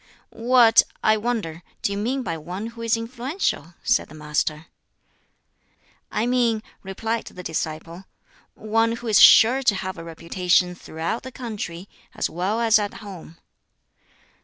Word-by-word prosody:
"What, 235 -1 +5 0.2
I 215 - +5
wonder, 215 -8 -3 0.2
do - - +1
you 200 - -2
mean 255 +5 -1
by 165 - -3
one 180 +6 -6
who 230 - -10
is 230 0 +1
influential?" 235 - -3
said 245 - +1
the 155 - -12
Master. 150 0 -2 1.5
"I 220 - 0
mean," 240 -3 +1 0.2
replied 225 +4 -3
the 180 - -10
disciple, 165 +2 -5 0.5
"one 225 +1 +1
who 235 +1 -7
is 215 -3 +5
sure 250 +4 +8
to 230 -6 +3
have 185 -2 -5
a - - -7
reputation 180 +2 0
throughout 170 +4 -4
the 260 - -9
country, 205 -8 -6 0.3
as - - -2
well 190 +6 -1
as 225 -2 +4
at 205 -1 -3
home." 175 -4 -10
210 Hz, 145 wpm, -23 LUFS, 170-230 Hz, 1.5 s, sure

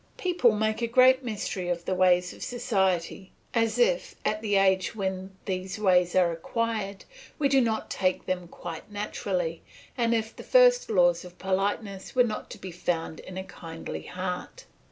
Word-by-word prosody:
People 345 - +3
make 220 +1 0
a 235 - +1
great 255 +2 +5
mystery 205 -5 -3
of 170 -1 -2
the - - 0
ways 180 -1 +3
of - - -14
society, 190 -7 -1 0.2
as 230 -1 +1
if, - - +2
at 215 0 0
the 205 -2 0
age 190 0 +3
when 190 -1 -3
these 185 0 -3
ways 180 -4 +3
are 180 -2 +4
acquired, 205 +3 -3 0.3
we 290 - +2
did 270 -2 +4
not 220 -2 -2
take 185 -1 0
to - - -29
them 180 -2 -2
quite 170 +2 -8
naturally, 185 -5 -2 0.3
and 235 -2 +2
as 220 -1 +1
if 225 - -16
the - - -9
first - - +5
laws 175 -4 +3
of 180 0 -12
politeness 195 +2 -2
were 250 - +6
not 215 -3 -4
to - - -8
be 190 -2 -8
found 165 -2 -2
in 185 - -9
a 190 - -3
kindly 165 -3 -7
heart. 185 - -5
195 Hz, 180 wpm, -27 LUFS, 180-230 Hz, 0.3 s, were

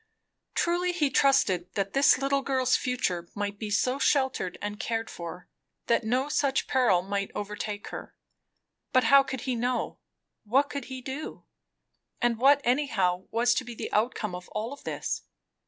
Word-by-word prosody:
Truly, 355 +1 +1
he 300 -6 +1
trusted 195 -12 +3
that 195 -1 -1
this 275 -1 +5
little 275 +1 +1
girl's 260 -2 +2
future 180 -9 -1
might 205 -1 -3
be 215 - -4
so 250 +6 +1
sheltered 265 -11 +1
and 205 +1 -5
cared 225 0 -2
for, 170 +1 -8 0.4
that 235 - +2
no 250 +5 +1
such 280 -2 +1
peril 225 -9 +3
might 200 +1 -2
overtake 210 0 -4
her; - - -8 0.8
but 255 - +5
how 275 +4 +7
could 265 -2 -5
he 260 - -1
know? 245 +1 -1 0.4
What 270 +7 +2
could 280 -3 -4
he 260 -1 -7
do? 275 +4 -6 0.7
and 235 -2 +1
what 280 +3 +6
anyhow 215 -9 +1
was 240 +1 +3
to 255 - -1
be 240 -1 -8
the - - -6
outcome 215 -2 0
of 180 0 -8
all 225 +6 -3
this? - - -4
240 Hz, 160 wpm, -28 LUFS, 205-270 Hz, 0.8 s, how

